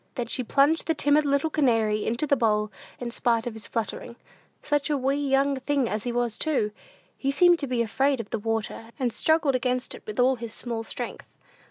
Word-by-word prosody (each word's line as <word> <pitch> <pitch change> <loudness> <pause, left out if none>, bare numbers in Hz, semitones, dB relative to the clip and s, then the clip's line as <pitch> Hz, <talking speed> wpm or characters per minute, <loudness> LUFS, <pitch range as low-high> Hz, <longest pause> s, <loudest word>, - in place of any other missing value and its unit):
Then 245 - -2
she 250 +2 -2
plunged 285 +6 +2
the 325 - +1
timid 290 +1 +3
little 280 +3 +1
canary 225 -8 +2
into 235 +6 0
the 280 - +3
bowl, 215 -4 +1 0.3
in 240 -1 -4
spite 230 -1 +1
of 240 - -3
his 220 -1 -7
fluttering. 235 +1 -4 0.5
Such 290 0 0
a 295 - +1
wee 270 +1 +1
young 275 -1 +1
thing 275 -2 0
as 215 +1 -3
he 245 - -1
was 240 -2 -1
too! 275 -9 0 0.4
He 275 - -2
seemed 350 +4 +5
to 280 - -3
be 245 -2 +1
afraid 265 +4 +1
of 220 -2 -6
the 225 - -1
water, 225 +1 -3
and 250 -5 -1
struggled 315 -3 +2
against 255 0 -1
it - - -10
with 215 +1 -5
all 255 +1 +4
his 230 -1 -5
small 230 -2 -2
strength. - - -7
250 Hz, 210 wpm, -26 LUFS, 225-280 Hz, 0.5 s, seemed